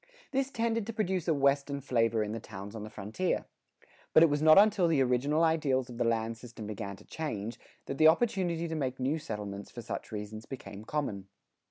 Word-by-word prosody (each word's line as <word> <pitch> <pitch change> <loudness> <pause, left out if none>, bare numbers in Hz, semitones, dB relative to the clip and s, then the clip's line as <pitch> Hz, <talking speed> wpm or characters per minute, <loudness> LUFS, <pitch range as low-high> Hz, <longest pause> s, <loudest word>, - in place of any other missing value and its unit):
This 270 -1 0
tended 230 -4 -1
to 230 - -4
produce 190 -5 -1
a 165 - +4
Western 140 0 +2
flavor 115 -4 +1
in 105 - -4
the 115 - -3
towns 100 -1 -9
on 110 - -6
the 110 - -7
frontier. 110 - -2 0.7
But 160 - +8
it 165 - +5
was 145 0 +1
not 155 0 +7
until 200 -3 +6
the 155 -5 +3
original 135 +6 +2
ideals 140 -6 +1
of 120 - -9
the - - +3
land 115 -1 0
system 120 -2 -9
began 100 -1 -5
to - - -17
change, 115 -8 -4 0.3
that 135 - -5
the 155 - +8
opportunity 170 -2 +2
to 165 - -4
make 130 -4 -2
new 140 +5 0
settlements 100 -5 -6
for 120 - -8
such - - -6
reasons 110 +1 -6
became 110 -6 -8
common. 110 -11 -3
135 Hz, 205 wpm, -31 LUFS, 110-160 Hz, 0.7 s, But